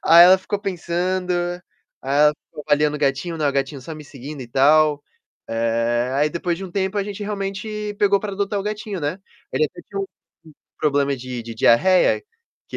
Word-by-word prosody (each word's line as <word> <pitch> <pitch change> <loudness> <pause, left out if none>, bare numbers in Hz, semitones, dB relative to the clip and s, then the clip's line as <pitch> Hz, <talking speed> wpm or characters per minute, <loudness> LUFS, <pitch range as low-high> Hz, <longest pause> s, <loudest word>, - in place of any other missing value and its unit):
Aí 170 +1 +9
ela 185 +1 +7
ficou 200 +2 -3
pensando, 180 -1 -2 0.7
aí 135 - -3
ela 150 0 +6 0.2
ficou 150 - -10
olhando 150 0 +3
o 150 - -3
gatinho, 140 +4 -1
né, 150 -2 +1
o - - 0
gatinho 135 +1 -2
só 160 +5 -8
me 155 -1 -10
seguindo 140 +1 -9
e 120 - -11
tal. 145 +3 +4 0.5
Eh, 115 +2 0
aí 145 +2 +2
depois 170 0 -2
de 195 - -6
um 185 - -8
tempo, 190 +1 -1
a 200 - 0
gente 205 0 -6
realmente 205 +1 -4
pegou 200 -1 +4
para 205 0 -5
adotar 200 +1 -1
o - - -2
gatinho, 210 -2 -4
né. 150 +5 -2 0.3
Ele - - +2
até 150 - -6
tinha 200 -1 -5
um - - -1 0.6
um - - -42
problema 140 -2 +2
de 125 -1 -6
de 115 0 -8
diarreia, 145 +12 +4 0.5
que - - -5
160 Hz, 200 wpm, -21 LUFS, 140-195 Hz, 0.7 s, Aí